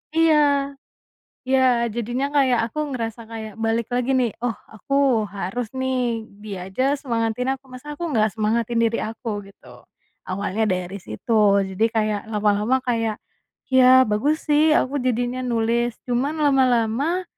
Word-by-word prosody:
Iya, 290 -4 +3 0.7
iya 255 -3 +3
jadinya 240 +5 -2
kayak 260 -4 +3
aku 305 - -7 0.2
ngerasa 230 -1 -4
kayak 220 -2 -7
balik 225 0 0
lagi 250 +1 0
nih, 245 -4 +1
"Oh 245 - +1 0.2
aku 260 0 +1
harus 205 +4 -4
nih, 250 -4 -1 0.2
dia 195 -4 -6
aja 270 +7 +1
semangatin 235 +1 -1
aku 270 - -15
masa 295 +4 -8
aku 345 +1 -3
gak 215 -1 +2
semangatin 230 +2 0
diri 230 0 +1
aku" 220 -2 -5
Gitu, 195 - -16 0.6
awalnya 200 +3 -1
dari 185 +1 -2
situ 200 - +2
jadi 220 +4 +1
kayak 215 -2 0
lama-lama 210 +4 +2
kayak, 225 -3 -1 0.5
ya 260 0 +7
bagus 275 +10 0
sih 300 +1 +4
aku 280 +2 0
jadinya 245 0 -1
nulis 235 0 0
cuman 260 +5 0
lama-lama, 265 +4 +2
235 Hz, 140 wpm, -22 LUFS, 220-260 Hz, 0.7 s, ya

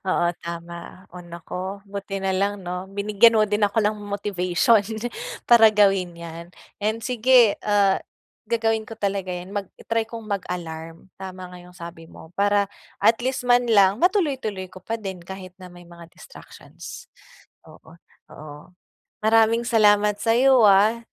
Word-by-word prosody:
oo 175 -1 +1 0.2
tama 170 +2 -8
o 180 - -9
naku, 180 +3 -7
buti 200 -1 -6
na 190 - +1
lang 200 0 -1
'no, 180 +1 -5
binigyan 205 +3 +3
mo 215 - +4
din 210 0 -1
ako 210 +2 -1
ng 210 +1 +1
motivation 205 +1 +1 0.6
para 235 -2 +7
gawin 195 -4 +2
yan 170 0 -9 0.4
and 220 +2 -2
sige, 245 -2 +4
ah, 200 -2 +2 0.5
gagawin 225 -1 +1
ko 225 - -9
talaga 195 -2 -2
yan 180 +2 -7
mag 200 -3 -4
i-try 230 0 -1
kong 230 -2 -8
mag-alarm. 170 -4 -6
Tama 185 -1 -9
nga - - -10
yung 180 0 -16
sabi 170 -2 -11
mo 160 +2 -15
para 205 0 +2 0.3
at 225 +1 +3
least 255 0 -2
man 245 0 +4
lang 200 - +4
matuloy-tuloy 275 - 0
ko 185 0 -15
pa 225 +4 -4
din 190 -4 -7
kahit 185 0 -10
na 180 -1 -11
may 175 0 -15
mga 170 -1 -14
distractions. - - -13 0.6
Oo, 160 - -17 0.4
oo 150 -1 -11 0.7
maraming 225 +1 +4
salamat 210 -2 +3
sa'yo 245 +1 +4
ah, 205 +3 +4
200 Hz, 150 wpm, -23 LUFS, 180-220 Hz, 0.7 s, para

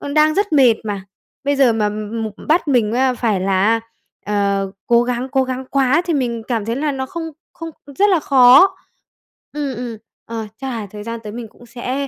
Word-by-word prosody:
đang 310 0 +4
rất 405 -3 0
mệt 260 -6 +6
mà, 205 -3 -4 0.4
bây 285 0 +1
giờ 260 -4 +4
mà 210 -2 +1
m 215 +2 -4 0.2
bắt 320 +1 +2
mình, 235 -5 +2
a, 260 +1 +2
phải 225 -5 0
là 190 0 +1
á, 225 0 +2 0.4
ờ, 200 -1 0 0.2
cố 235 0 +4
gắng 250 +1 -3
cố 265 0 +2
gắng 260 0 -4
quá 275 +3 +3
thì 340 - 0
mình 235 -5 -1
cảm 230 -5 -1
thấy 230 +1 -2
là 295 +3 -1
nó 265 -1 -3
không 335 +4 -6 0.3
không 330 0 -7 0.3
rất 410 0 +5
là 360 -4 +3
khó. 270 +6 +6 0.8
Ừm, 290 -3 -3
ừm. 235 -1 -5 0.3
Ờ, 225 -2 -5
chắc 270 - -6
là 225 -4 -4
thời 210 -1 -8
gian 230 +1 -5
tới 210 - -7
mình 235 -1 -6
cũng 240 - -18
sẽ 255 +4 -4
245 Hz, 210 wpm, -19 LUFS, 220-275 Hz, 0.8 s, mệt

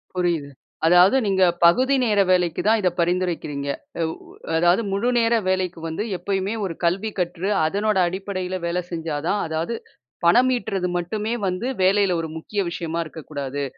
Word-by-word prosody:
புரியுது. 170 -5 0 0.4
அதாவது 180 +6 +6
நீங்க, 190 -1 +3 0.2
பகுதி 255 +11 +4
நேர 210 -3 +2
வேலைக்கு 175 -3 +2
தான், 225 0 +4
இத 185 - +3
பரிந்துரைக்கிறீங்க. 170 -5 -1 0.3
அவ் 160 0 -1 0.4
அதாவது 175 +5 +4
முழு 200 +5 0
நேர 230 0 +2 0.2
வேலைக்கு 185 -2 -1
வந்து, 165 +6 -3
எப்பயுமே 195 +2 -2
ஒரு 170 -3 -4
கல்வி 195 +6 0
கற்று, 180 +2 -2 0.2
அதனோட 205 +5 0
அடிப்படையில 185 0 -4
வேல 180 +1 -1
செஞ்சா 165 -3 -3
தான், 205 +2 +1
அதாது 160 +8 -2 0.5
பணம் 245 +10 +5
ஈட்றது 190 -4 -2
மட்டுமே 210 +6 -2
வந்து, 185 +7 -2 0.2
வேலையில 195 -1 +3
ஒரு 160 - -5
முக்கிய 200 +5 -2
விஷயமா 170 -1 -3
இருக்க 160 0 -10
கூடாது. 140 -1 -3
180 Hz, 155 wpm, -23 LUFS, 170-200 Hz, 0.5 s, அதாவது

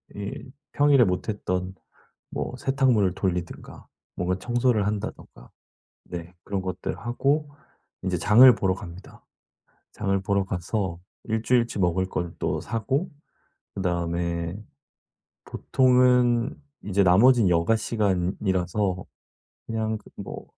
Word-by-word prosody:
이 105 +5 -6 0.2
평일에 145 -3 +5
못했던 90 -1 -2 0.5
뭐 - - -4
세탁물을 130 -9 +2
돌리든가 90 -3 -4 0.3
뭔가 90 +1 -1
청소를 120 -2 +1
한다든가 105 - -5 0.6
네 90 0 -8
그런 100 -1 -2
것들 95 0 -4
하고 140 +5 0 0.5
이제 90 -2 0
장을 120 +8 +7
보러 95 -1 0
갑니다. 90 0 -12 0.7
장을 95 0 -1
보러 100 0 +1
가서 95 -1 -3 0.3
1 110 0 -2
주일치 120 -4 +1
먹을 95 +1 +1
걸 85 -2 -3
또 - - -1
사고 135 - -2 0.6
그다음에 85 -1 -2 0.9
보통은 125 -1 +3 0.3
이제 100 0 +1
나머지는 105 +4 +5
여가 85 +5 +3
시간이라서 95 -2 -1 0.6
그냥 110 -1 -2
그 - - -19
뭐 - - -8
100 Hz, 235 characters per minute, -25 LUFS, 90-120 Hz, 0.9 s, 장을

